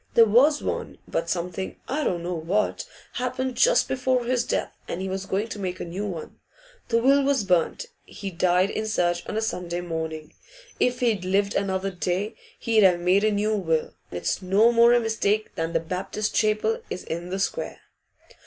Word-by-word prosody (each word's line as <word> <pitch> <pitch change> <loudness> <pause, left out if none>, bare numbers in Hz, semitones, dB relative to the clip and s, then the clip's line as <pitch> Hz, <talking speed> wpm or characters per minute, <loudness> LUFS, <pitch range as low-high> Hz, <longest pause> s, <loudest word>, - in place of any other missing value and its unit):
There 230 - +8
was 265 +8 +4
one, - - -3
but 165 - -2
something 180 +2 -3
I 300 +3 -1
don't 175 -8 -1
know 180 +1 -2
what 175 +6 -1 0.3
happened 255 0 -2
just - - +4
before 255 -1 0
his 245 0 +1
death, - - -2
and 170 - -4
he 190 - -3
was 190 +1 -4
going 200 +4 -1
to 210 - -6
make 185 -2 -3
a - - -4
new 190 +5 -4
one. 170 -5 -7 0.5
The 230 - +2
will 275 +4 +5
was 275 -5 +2
burnt. 180 - +1 0.2
He 195 -2 -7
died 180 +2 +2
in 220 - -2
church 175 -4 0
on 215 - -2
a - - +1
Sunday 175 -5 -3
morning; 160 -2 -5 0.5
if 250 +1 +1
he'd 220 -6 +1
lived 200 +2 +1
another 195 0 -1
day, 185 +4 -2 0.2
he'd 225 -2 +2
have 180 -3 +5
made 180 +3 +3
a 215 - +4
new 210 +1 +1
will. 165 -6 0 0.2
It's 90 - -2
no 200 +5 +4
more 235 0 +6
a 240 - +5
mistake 220 -2 0
than 165 0 -2
the 165 - +3
Baptist 185 +5 -3
Chapel 215 +1 +1
is 180 - -5
in 170 +2 -5
the 190 - -2
square! 340 - -3
195 Hz, 190 wpm, -25 LUFS, 180-230 Hz, 0.5 s, There